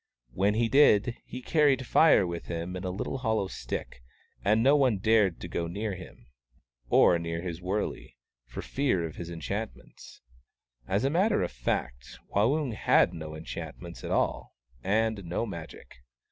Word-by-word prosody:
When 100 +6 +1
he 115 +1 +2
did, 120 -3 +4
he 125 0 -8
carried 140 -4 +3
Fire 155 -7 +5
with 85 -1 -5
him 85 +2 -4
in 90 - -5
a 95 - -2
little 100 +8 -4
hollow 110 -5 0
stick, 60 - -6 0.4
and 110 +3 +3
no 140 +3 +6
one 130 -7 +3
dared 105 -3 +2
go 85 - -2
near 100 +4 -3
him, 90 0 -11 0.6
or 85 - +5
near 85 0 -4
his 90 -1 -5
wurley, 90 -9 -3 0.3
for - - -7
fear 130 -12 0
of 80 - -8
his 85 -1 -6
enchantments. 85 - -7 0.7
As 100 +4 0
a 135 - +1
matter 200 +6 +2
of - - -3
fact, - - -3 0.2
Waung 130 +5 +2
had 105 - +3
no 80 -2 -7
enchantments 85 +2 -8
at - - -5
all, - - -1 0.3
and 110 0 +1
no 85 +6 -2
Magic. 85 - -9
100 Hz, 160 wpm, -28 LUFS, 85-115 Hz, 0.7 s, no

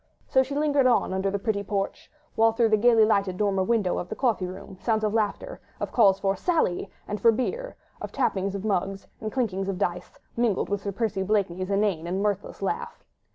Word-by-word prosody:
So 265 - +4
she 265 +2 -3
lingered 290 -3 +3
on 240 -6 +2
under 190 +1 0
the 200 - -1
pretty 200 0 -1
porch, 200 -1 -3 0.2
while 225 0 +4
through 225 0 +3
the 215 - +5
gaily 225 0 +5
lighted 195 -4 +1
dormer 200 -2 +1
window 210 -2 +1
of 180 - -6
the - - -4
coffee 230 -8 0
room 185 +1 -9
came - - -27
sounds 220 -2 +1
of 210 -1 0
laughter, 225 - -2 0.2
of - - -3
calls 195 -5 +4
for 195 0 +1
"Sally" 315 - 0 0.2
and 210 0 -4
for 230 - +6
beer, 475 - -3 0.3
of - - -5
tapping 190 0 0
of 200 +1 -4
mugs, 195 -1 -1
and 215 - -4
clinking 195 -7 -1
of 195 -2 -2
dice, 180 -2 -3 0.2
mingled 230 -4 +1
with 200 -1 -1
Sir 200 - -3
Percy 210 -1 -1
Blakeney's 190 -2 0
inane 195 -5 0
and 185 +2 -1
mirthless 200 -1 -2
laugh. 470 - -3
205 Hz, 210 wpm, -26 LUFS, 195-230 Hz, 0.3 s, for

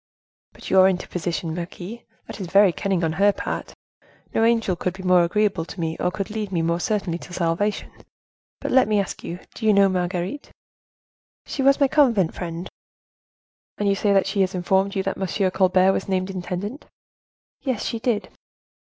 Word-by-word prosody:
"But - - -9
your 190 0 +7
interposition, 175 -2 -3
marquise; 175 +6 -6 0.3
that - - -9
is 185 - -4
very 195 +2 +5
cunning 190 -3 -1
on 160 -1 0
her 205 0 +6
part. - - -5 0.6
No 225 - +2
angel 225 -5 +2
could 180 +1 -3
be 190 - -9
more 180 -1 +5
agreeable 200 0 +1
to 185 - -10
me, 160 -1 -2
or - - +1
could 195 +2 -4
lead 210 -2 -4
me 170 -3 0
more 170 +1 0
certainly 190 -4 -1
to 180 - -11
salvation. 175 +5 -1 0.7
But, - - -3
let 260 -2 +5
me 210 -1 +2
ask 195 - -4
you, 175 +2 -6
do - - -10
you 215 - +6
know 200 -1 +5
Marguerite?" 180 +7 -2 1.0
"She 275 - -3
was 275 +2 +4
my 280 - +5
convent 235 - +3
friend." 170 0 -5 1.1
"And 205 - -1
you 200 - +4
say 200 +1 +1
that 195 -1 +4
she 195 +1 0
has 190 0 0
informed 190 +2 +1
you 195 - 0
that 195 - -2
Monsieur 190 0 0
Colbert 185 0 +4
was 195 - -3
named 185 0 0
intendant?" 190 +7 -5 0.8
"Yes, 255 -6 -2
she 230 - -2
did." 225 -2 -1
190 Hz, 185 wpm, -23 LUFS, 180-210 Hz, 1.1 s, your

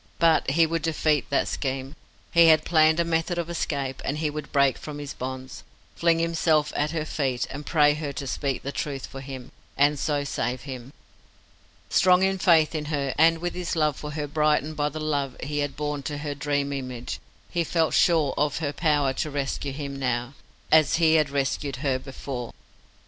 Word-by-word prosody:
But 165 -3 +3
he 165 +4 +4
would 165 0 -1
defeat 155 -3 +1
that 140 - +1
scheme. 135 +1 -3 0.4
He 170 -1 +6
had 155 -1 +5
planned 160 -1 +4
a 170 - +2
method 165 +1 0
of 170 0 -3
escape, 140 -5 -3
and 145 - -2
he 155 -1 -1
would 150 0 -7
break 140 -2 +3
from 150 -1 -7
his 145 -1 -6
bonds, 130 0 -6 0.3
fling 170 -1 +3
himself 165 -2 +1
at 150 +1 +1
her 155 -1 -2
feet, 130 -6 -1
and 145 +2 -7
pray 150 -3 +4
her 150 -1 -4
to 140 - -5
speak 135 0 -2
the 140 - -3
truth 140 -3 -4
for 135 - -9
him, 130 -2 -8 0.3
and 145 +1 +3
so 145 -1 0
save 130 -2 -2
him. 130 -2 -8 1.0
Strong 185 0 +5
in 190 - +3
his - - -9
faith 165 -4 +5
in 155 -2 -3
her, 145 -3 -1
and 165 +1 +6
with 175 +2 -3
his 180 -1 -3
love 155 -3 +2
for 150 +2 -7
her 150 -1 -3
brightened 150 +1 +1
by 150 0 0
the 155 +2 -6
love 145 -4 -2
he 145 +2 -3
had 145 -1 -2
borne 150 -1 -2
to 145 +1 -4
her 145 0 -4
dream 145 0 -1
image, 125 -3 -5 0.3
he 170 -1 +1
felt 165 0 +1
sure 160 -5 +3
of 145 0 +1
her 150 -3 -2
power 145 -3 +1
to 155 - -2
rescue 140 0 -3
him 140 0 -5
now, 125 -1 -2 0.4
as 155 -2 +5
he 160 -1 +4
had 155 -3 +3
rescued 140 0 -1
her 130 -2 +1
before. 130 -2 -6
145 Hz, 200 wpm, -25 LUFS, 140-160 Hz, 1.0 s, He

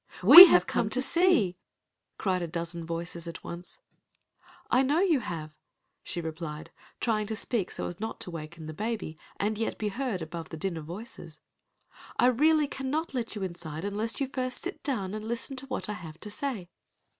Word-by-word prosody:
"We 320 - +13
have 180 - +5
come 230 -3 0
to 255 - 0
see," 265 - +3 0.6
cried 185 -2 0
a 170 - -2
dozen 170 0 -5
voices 170 0 -5
at 170 - -8
once. 170 +1 -8 0.9
"I 250 - +5
know 290 +6 +2
you 340 -8 +3
have," 165 -8 -6 0.5
she 175 - -5
replied, 160 -1 -6 0.3
trying 215 -3 0
to 220 - -3
speak 215 -3 -1
so - - -4
as 175 - -6
not 220 +1 -5
to 180 - -4
waken 160 0 -8
the 155 - -6
baby 210 -5 -4 0.2
and 210 +1 -1
yet 225 - -2
be 215 - -1
heard 225 -5 -3
above 165 0 -7
the 160 - -7
din 180 +2 -2
of 155 - -7
voices. 170 -3 -9 0.8
"I - - +4
really 300 +5 +4
cannot 280 +4 -3
let 240 -3 -3
you 205 - -4
inside 170 -2 -5
unless 210 +3 -3
you 275 - 0
first 255 -1 -3
sit 370 - -5
down 205 -10 -2
and 215 0 -5
listen 235 +4 -3
to 265 +1 -5
what 265 - -3
I 210 - -3
have 165 -5 -9
to 210 - -7
say." 225 - -4
205 Hz, 190 wpm, -28 LUFS, 170-255 Hz, 0.9 s, We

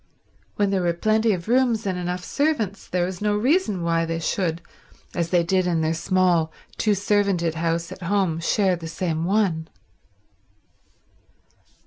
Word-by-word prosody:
When 205 -1 +1
there 195 -2 +1
were 175 -1 +1
plenty 215 +5 +2
of 180 -2 -3
rooms 240 -2 +2
and 190 -2 -1
enough 180 0 -3
servants 255 -10 -1
there 180 -1 0
was 180 0 -6
no 210 0 +1
reason 225 - +1
why 165 0 +1
they 165 0 -2
should, 165 0 -1 0.5
as 170 -2 -1
they 175 -1 +3
did 185 +1 +1
in 170 -2 +1
their 160 0 +1
small, 170 -1 +2 0.3
two 215 - +2
servanted 200 -4 +1
house 165 +1 -1
at 185 - -9
home, 180 -3 0
share 185 +2 +2
the 165 -1 -7
same 165 -1 -2
one. 180 -5 +1
180 Hz, 155 wpm, -23 LUFS, 170-205 Hz, 0.5 s, they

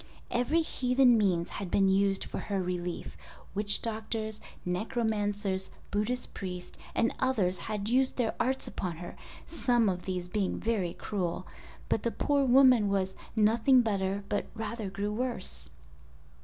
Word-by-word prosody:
Every 270 +8 +2
heathen 250 -3 +4
means 185 -6 +2
had 195 -3 -5
been 195 +2 +3
used 195 0 +3
for - - -5
her 200 -2 -2
relief. 180 -1 -3 0.4
Witch 205 +1 +2
doctors, 220 -1 -3 0.2
necromancers, 205 -1 -1 0.2
Buddhist 225 +5 -1
priests, 180 -2 -6 0.2
and 230 - +2
others 205 -9 +1
had 210 0 -3
used 260 +3 +2
their 235 -3 +1
arts 260 +2 0
upon 175 -4 -4
her 175 +1 -8 0.3
(some 240 -9 +2
of 180 -2 -3
these 180 -2 -3
being 195 +1 -1
very 205 -7 -1
cruel), 185 -3 -3 0.4
but 220 - +1
the 235 - 0
poor 285 +4 +1
woman 255 -4 +6
was 190 -1 0 0.2
"nothing 230 +4 +5
better, 200 -3 -1
but 205 - -1
rather 225 -2 -4
grew 200 +2 -2
worse." 210 - -3
210 Hz, 140 wpm, -30 LUFS, 190-235 Hz, 0.4 s, woman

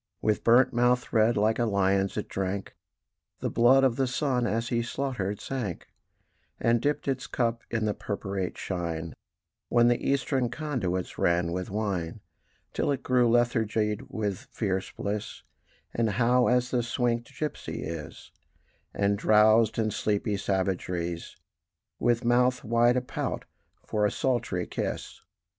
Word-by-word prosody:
With 105 -1 0
burnt 120 +2 +5
mouth 125 +1 +2
red 110 0 +4
like 110 +3 +2
a 120 - +2
lion's 100 -2 +1
it - - -3
drank 95 0 -3 0.6
The - - -2
blood 125 +4 +5
of 130 -3 +2
the 135 -1 +1
sun 125 -2 0
as 115 +2 -1
he 120 -1 +1
slaughtered 115 -6 -3
sank, 120 -10 -4 0.7
And 115 0 +2
dipped 145 0 -1
its 130 -1 -1
cup 115 -1 -1
in 110 -2 -1
the 105 - +1
purpurate 100 -3 -4
shine 85 -4 -4 0.6
When 120 0 +5
the 120 - +1
eastern 135 -2 +1
conduits 120 - -3
ran 85 0 +2
with 90 +1 -3
wine; 100 -5 -2 0.5
Till - - 0
it 140 - -2
grew 125 -2 +3
lethargied 110 -3 +1
with 105 -4 -3
fierce 95 -3 -2
bliss, 105 +1 -4 0.5
And 115 -1 +1
hot 120 +4 +3
as 125 0 +1
a - - +3
swinkèd 120 +2 -2
gipsy 155 -1 -4
is, 80 -2 -7 0.6
And 100 0 +1
drowsed 110 +1 +5
in 110 -1 +1
sleepy 105 0 0
savageries, 90 -3 -2 0.6
With 120 0 +1
mouth 125 +1 +3
wide 120 +1 +3
a - - +2
pout 125 - -4 0.4
for 105 -1 +1
a - - -3
sultry 120 -9 -1
kiss. - - -4
115 Hz, 145 wpm, -28 LUFS, 100-125 Hz, 0.7 s, burnt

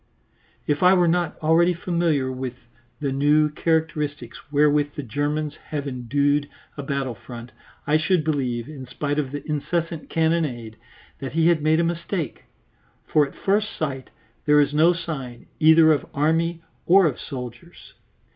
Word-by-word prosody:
If 145 0 0
I 180 +1 +6
were 175 -2 +3
not 170 -1 0
already 170 +3 +4
familiar 170 -6 0
with 130 -1 -5 0.4
the 140 -3 -2
new 150 +3 +3
characteristics 150 -5 -2
wherewith 145 0 +2
the 145 - -4
Germans 145 +4 -2
have 145 -2 -4
endued 140 +3 0 0.3
a 145 - -5
battle 135 -2 -2
front, 120 +2 -10 0.3
I 150 +2 +3
should 155 +2 +1
believe, 130 -6 -1
in 140 -4 -9
spite 145 +3 -2
of 135 -3 -2
the 145 +1 -6
incessant 165 +2 -2
cannonade, 155 -9 -1 0.4
that 135 - -6
he 165 +1 +3
had 165 -3 +2
made 155 +2 +3
a - - +3
mistake, 170 -1 -3 0.6
for 150 -2 +3
at - - -15
first 210 +2 0
sight 135 -4 -4 0.4
there 150 0 +6
is 145 0 +2
no 160 +3 +5
sign 140 -8 -6
either 160 0 +6
of 150 - 0
army 165 +3 +1 0.2
or 190 +2 +6
of 145 -6 -1
soldiers. 125 +4 -9
150 Hz, 155 wpm, -23 LUFS, 140-165 Hz, 0.6 s, I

